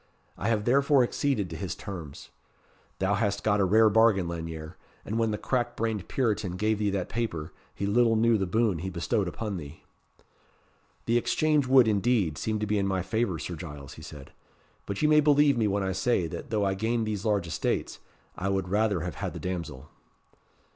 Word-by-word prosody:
I 100 - -3
have 110 -2 +1
therefore 140 +1 +4
acceded 125 -5 0
to - - -5
his 85 +2 -4
terms. 85 -9 -8 0.7
Thou 95 +2 +1
hast 100 0 0
got 105 -1 +2
a 100 - +3
rare 110 +4 +5
bargain, 110 -4 +4
Lanyere; 80 -1 -6 0.3
and 110 +3 -2
when 115 -1 +2
the 105 - -1
crack 120 0 -1
brained 110 -4 -2
Puritan 105 -7 -1
gave 105 +2 0
thee 105 -1 +1
that 95 -2 -2
paper, 85 -10 -3 0.2
he 100 - -3
little 115 +2 +3
knew 115 +1 +4
the 95 - -1
boon 110 -2 +1
he 95 +3 -4
bestowed 95 +2 -1
upon 100 +2 -4
thee." 75 -2 -10 1.2
"The 115 +1 +2
exchange 140 +4 +1
would, 130 -2 +6
indeed, 105 -6 +1
seem 110 -1 -1
to 105 - -2
be 105 0 0
in 100 - 0
my 95 -2 -1
favour, 100 -2 -1
Sir 85 - -5
Giles," 75 -4 -9
he - - -12
said; 75 -4 -11 0.6
"but 100 - -3
you - - +5
may 150 0 +6
believe 145 -1 +4
me 115 -3 +1
when 100 0 0
I 95 - -1
say, 95 0 +1
that 110 - -7
though 105 -3 0
I 95 - +1
gain 115 +4 -1
these 105 -2 -3
large 105 -5 +1
estates, 85 - -2 0.4
I 95 - -2
would 95 -2 -1
rather 105 -2 +1
have 90 -1 -4
had - - -3
the - - -6
damsel." 85 -6 -5
105 Hz, 200 wpm, -27 LUFS, 90-115 Hz, 1.2 s, would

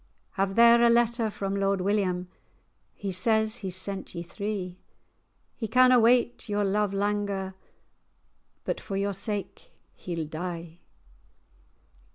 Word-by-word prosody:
"Have 195 -1 -1
there 235 0 +7
a 235 - +6
letter 235 -1 +2
from 195 -1 -4
Lord 195 0 +1
William; 185 -2 0 0.7
He 200 -1 -4
says 220 +4 +1
he's 190 -6 -2
sent 190 +1 -2
ye 170 - -4
three; 185 -1 -5 0.8
He 225 - -4
canna 255 +2 +5
wait 240 0 +2
your 205 0 0
love 205 +1 +1
langer, 200 -1 -2 1.1
But - - -3
for 195 - -4
your 200 0 -1
sake 205 - -4 0.2
he'll 170 -3 -5
die." 170 +1 -6
200 Hz, 125 wpm, -27 LUFS, 185-220 Hz, 1.1 s, there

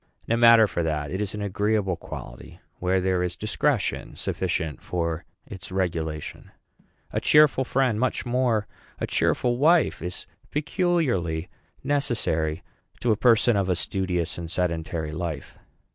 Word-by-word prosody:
No 115 - +2
matter 115 -1 +7
for 95 -4 -2
that; 75 -3 -2
it 95 +3 -2
is 105 0 -2
an 105 - -4
agreeable 100 -1 0
quality, - - -10 0.2
where 95 +1 +1
there 90 -1 +1
is 90 -1 -2
discretion 110 +1 -1
sufficient 75 -5 -2
for 85 -2 -3 0.2
its 95 0 -9
regulation. 80 -5 -3 0.6
A - - 0
cheerful 150 -3 +5
friend, 130 -4 +1
much 130 +1 0
more 120 -3 +1 0.3
a - - -1
cheerful 120 0 +1
wife, 160 +3 +3
is 90 +1 -5 0.2
peculiarly 145 - 0 0.3
necessary 110 - 0 0.4
to 120 - +1
a - - +4
person 115 0 +4
of 100 -2 0
a 90 - +2
studious 90 -2 -1
and 85 -1 -6
sedentary 80 -2 -2
life. 80 -3 -5
95 Hz, 140 wpm, -25 LUFS, 85-120 Hz, 0.6 s, matter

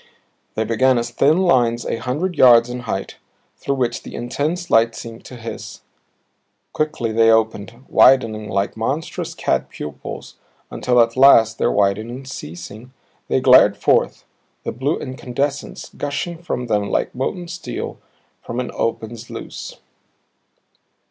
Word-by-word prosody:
They 110 - 0
began 125 +3 +2
as 120 0 -2
thin 145 +6 +3
lines 120 -10 +2
a - - -2
hundred 150 +11 -2
yards 120 -3 +6
in 125 - -4
height 110 -5 -4 0.4
through 140 - -2
which 120 -3 -1
the - - -10
intense 155 +8 -3
light 115 0 +4
seemed 115 0 -9
to 125 - -10
hiss; 115 -1 -8 0.9
quickly 155 -7 -1
they 115 0 +4
opened 115 +2 0
widening 110 -5 +4
like 100 -1 -1
monstrous 135 +8 -3
cat 65 0 -1
pupils 75 -2 -8 0.3
until 125 -1 +1
at 115 0 +1
last, 115 -4 +6
their - - +2
widening 110 +6 0
ceasing, 105 - -9 0.4
they - - +1
glared - - +6
forth, - - +1 0.4
the - - -3
blue 130 +7 -1
incandescence 135 +2 -4
gushing 165 +4 -4
from 125 -7 -3
them 105 -3 0
like - - -1
molten 175 +7 -3
steel 175 +1 -6 0.4
from 120 - -5
an 125 - -3
opened 115 0 -3
sluice. 120 - -8
120 Hz, 135 wpm, -20 LUFS, 110-135 Hz, 0.9 s, yards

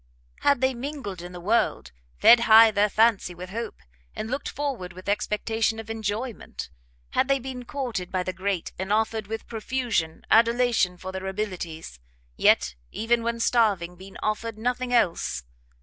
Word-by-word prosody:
Had 280 -3 +3
they 260 0 +3
mingled 240 - -6
in 175 +1 -8
the 180 - -8
world, 210 - 0 0.3
fed 235 - +8
high 225 -1 +8
their 210 0 +2
fancy 215 -4 +2
with 180 +1 -8
hope, 230 +1 -4 0.4
and 220 - -5
looked 280 +2 -2
forward 260 -11 -4
with 185 +1 -12
expectation 220 +2 0
of 225 0 -6
enjoyment; 220 - -4 0.4
had 265 - +2
they 275 0 +3
been 255 -1 -7
courted 235 -10 -4
by 185 -1 0
the 185 - -3
great, 190 -1 -2
and 190 +2 -3
offered 220 0 0
with 225 +1 -5
profusion 225 -8 -2
adulation 230 -5 +4
for 185 +1 -7
their 190 0 -5
abilities, 180 - -5 0.4
yet, 65 - +4 0.2
even 235 +1 +1
when 235 0 -2
starving, 205 -8 +2
been 190 +2 -12
offered 215 +1 -2
nothing 245 +2 -2
else! 185 - +1
220 Hz, 160 wpm, -26 LUFS, 185-235 Hz, 0.4 s, fed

